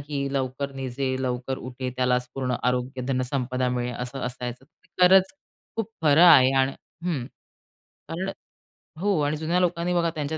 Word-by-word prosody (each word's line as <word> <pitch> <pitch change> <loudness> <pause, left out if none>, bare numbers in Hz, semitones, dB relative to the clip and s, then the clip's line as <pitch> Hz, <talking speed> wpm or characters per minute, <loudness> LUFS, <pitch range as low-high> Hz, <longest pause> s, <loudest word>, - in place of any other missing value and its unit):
की 140 -1 -3
'लवकर 135 +1 -2
निजे 130 0 -2
लवकर 130 +1 -2
उठे 130 0 -5
त्यालाच 125 0 +1
पूर्ण 130 -2 -1
आरोग्य 125 +1 -1
धनसंपदा 130 -1 -1
मिळे' 125 0 -2
असं 125 +2 -5
असायचं. 125 +1 -6 0.4
खरंच 190 +1 +6 0.4
खूप 225 -1 -2
खरं 150 +1 +5
आहे 130 -7 +8
आणि 130 +1 +1 0.3
हं. 155 -9 -1 0.8
कारण 185 +4 -3 0.7
हो 200 -3 +1
आणि 145 +1 0
जुन्या 165 +4 0
लोकांनी 175 0 0
बघा 170 -1 +2
त्यांच्या 155 +1 -2
135 Hz, 145 wpm, -25 LUFS, 125-160 Hz, 0.8 s, आहे